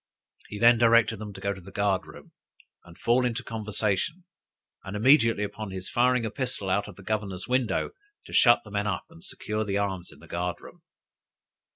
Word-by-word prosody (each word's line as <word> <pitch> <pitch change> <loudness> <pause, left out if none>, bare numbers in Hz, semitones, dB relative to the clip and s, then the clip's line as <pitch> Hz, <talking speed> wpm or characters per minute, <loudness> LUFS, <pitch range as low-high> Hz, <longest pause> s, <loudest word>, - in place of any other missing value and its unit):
He 105 - -6
then 115 +1 +6
directed 115 -1 +4
them 105 0 -7
to - - -10
go 100 - -1
into 100 -1 -4
the 90 - -12
guard 100 -1 0
room, - - -13 0.5
and 85 -1 -15
fall 120 +2 +2
into 125 0 -1
conversation, 110 - -2 0.6
and 95 - -6
immediately 115 -3 +4
upon 105 0 -5
his 95 -1 -7
firing 125 -1 +3
a 110 - -3
pistol 125 -6 -3
out 100 +2 +1
of 100 - -10
the 100 - -14
governor's 100 -3 -3
window, 125 -2 0 0.3
to - - -12
shut 120 -2 +6
the 105 - -13
men 100 +1 -1
up, 95 -4 -2
and 165 +1 -16
secure 110 - -4
the 100 -2 -1
arms 95 -3 -2
in - - -16
the - - -15
guard 90 0 -2
room. - - -14
105 Hz, 200 wpm, -27 LUFS, 100-120 Hz, 0.6 s, then